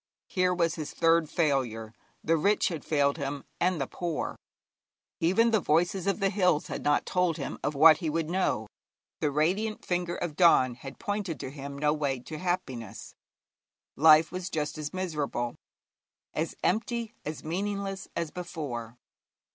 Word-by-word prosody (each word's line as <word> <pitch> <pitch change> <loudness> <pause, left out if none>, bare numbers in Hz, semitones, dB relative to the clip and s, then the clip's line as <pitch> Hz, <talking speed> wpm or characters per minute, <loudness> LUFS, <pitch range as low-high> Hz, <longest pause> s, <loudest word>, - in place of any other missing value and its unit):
Here 180 -1 +2
was 170 -3 +1
his 155 -3 -6
third 165 -1 +3
failure. 125 -10 0 0.3
The 165 - +3
rich 200 +7 +2
had 165 -4 -5
failed 140 -1 +2
him, 140 -1 -4 0.2
and 180 -1 +1
the 135 - 0
poor; 170 +3 -3 0.8
even 195 +8 +3
the 220 - +4
voices 175 +3 +1
of 200 - +1
the 195 -1 +2
hills 180 -6 +2
had - - -4
not 145 0 +2
told 180 -3 +1
him 140 -4 -5
of 145 +2 -1
what 155 +2 +8
he 165 -4 -2
would 160 0 -1
know; 175 - 0 0.5
the 150 - +1
radiant 185 +10 0
finger 175 -1 -1
of 170 -4 -4
dawn 150 -7 +5
had 135 +3 -10
pointed 205 -7 -3
to 130 - -5
him 140 0 -7
no 150 +1 +2
way 140 -4 -1
to 155 +5 -8
happiness. 130 - -4 0.8
Life 155 +1 +6
was 185 0 -4
just 150 -3 -2
as 150 -1 -4
miserable, 150 -10 -2 0.8
as - - -2
empty, 230 +3 0
as 155 +1 -5
meaningless, 195 +3 -3
as 170 -2 -2
before. 135 -10 -6
160 Hz, 160 wpm, -28 LUFS, 145-180 Hz, 0.8 s, what